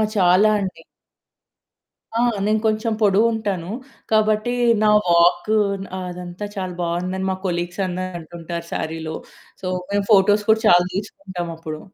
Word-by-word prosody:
చాలా 185 +2 +5
అండి. 190 -2 -5 1.3
ఆ! - - +1 0.3
నేను 215 +1 +2
కొంచెం 220 +1 +1
పొడువుంటాను. 205 -3 +1 0.4
కాబట్టి 215 +2 +2 0.3
నా 215 - +5 0.2
వాక్ 175 +3 +4 0.5
అదంతా 180 +2 -6
చాలా 185 -2 -4
బాగుందని 180 +2 -2
మా - - -1
కొలీగ్స్ 175 +1 -2
అందరూ 185 0 -4
అంటుంటారు 170 +1 -7
సారీలో. 160 0 -4 0.5
సో, 190 - -7 0.3
మేము 200 -1 0
ఫోటోస్ 205 +1 +5
కూడా 220 - +2
చాలా 175 -1 +6
తీసుకుంటామప్పుడు. 175 -6 -6
185 Hz, 115 wpm, -21 LUFS, 175-210 Hz, 1.3 s, చాలా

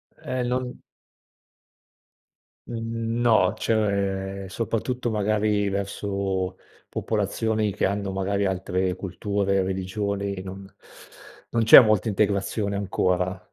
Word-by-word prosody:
Eh, 130 -1 -3
non 125 0 -3 1.9
Mhmm, 115 0 -3
no, 110 -6 +4
cioè 100 -3 -1
soprattutto 120 +3 -2
magari 105 -1 +1
verso 100 -1 -2 0.3
popolazioni 110 0 -1
che - - 0
hanno 100 0 -1
magari 100 +1 -1
altre 95 -1 -1
culture, 100 +1 -1
religioni, 100 +1 -3
non 95 +1 -8 0.8
non 115 -1 +1
c'è 110 - +11
molta 110 -2 +3
integrazione 100 0 0
ancora. 90 -2 0
100 Hz, 95 wpm, -25 LUFS, 95-110 Hz, 1.9 s, c'è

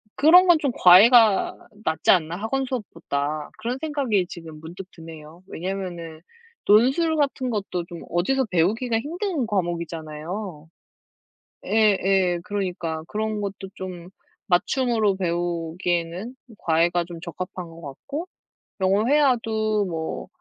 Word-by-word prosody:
'그런 360 +5 +7
건 345 -2 +7
좀 280 -4 0
과외가 210 +3 +6 0.3
낫지 160 - -1
않나?' 170 -2 +2
학원 265 +6 -2
수업보다. 155 - -4
그런 240 +3 -3
생각이 275 - 0
지금 165 -3 -10
문득 175 +4 -9
드네요. 160 +1 -12
왜냐하면은 175 -3 -5 0.5
논술 265 +10 +4
같은 270 -3 0
것도 195 -5 -3
좀 170 -1 -8
어디서 255 +10 +1
배우기가 225 +7 +1
힘든 335 - -2
과목이잖아요. 170 -2 -4 1.0
예예. 195 -4 +2
그러니까. 180 -6 -3
그런 215 0 -2
것도 195 -1 -5
좀 180 -2 -8 0.4
맞춤으로 220 +2 +2
배우기에는 175 +4 -2 0.2
과외가 170 +2 +2
좀 170 -1 -9
적합한 180 +1 -6
것 165 +1 -13
같고, 280 - -7 0.5
영어 195 +4 +2
회화도 225 -7 +2
뭐 165 -3 -4
190 Hz, 270 characters per minute, -24 LUFS, 170-230 Hz, 1.0 s, 그런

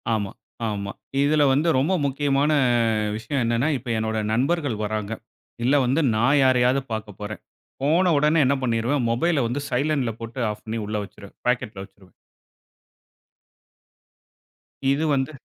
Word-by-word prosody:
ஆமா, 105 -3 -2 0.4
ஆமா. 100 -1 -4 0.3
இதில 150 +1 +3
வந்து 150 +5 +1
ரொம்ப 155 +8 +1
முக்கியமான 140 +1 +1 0.6
விஷயம் 115 +5 -2
என்னன்னா, 120 +4 +1
இப்ப 125 -1 -9
என்னோட 110 0 -1 0.2
நண்பர்கள் 140 0 0
வராங்க. 105 0 -3 0.5
இல்ல 130 +4 +3
வந்து 135 +6 +2
நான் 130 +6 +3
யாரையாது 130 0 +3
பாக்கப்போறேன். 105 -1 -6 0.4
போன 170 +5 +3
உடனே 150 +3 +3
என்ன 140 +2 +3
பண்ணிருவேன், 120 +2 0
மொபைல 140 +2 +1
வந்து 125 +5 -2
சைலன்ட்ல 135 -2 0
போட்டு 115 +3 -7
ஆஃப் 105 - -10
பண்ணி 115 +1 -3
உள்ள 105 +1 -3
வெச்சுருவேன். 100 +1 -13
பாக்கெட்ல 110 -5 -1
வெச்சுருவேன். 95 -1 -18 2.8
இது 140 +3 +1
வந்து 135 +1 0
125 Hz, 130 wpm, -23 LUFS, 110-145 Hz, 2.8 s, இதில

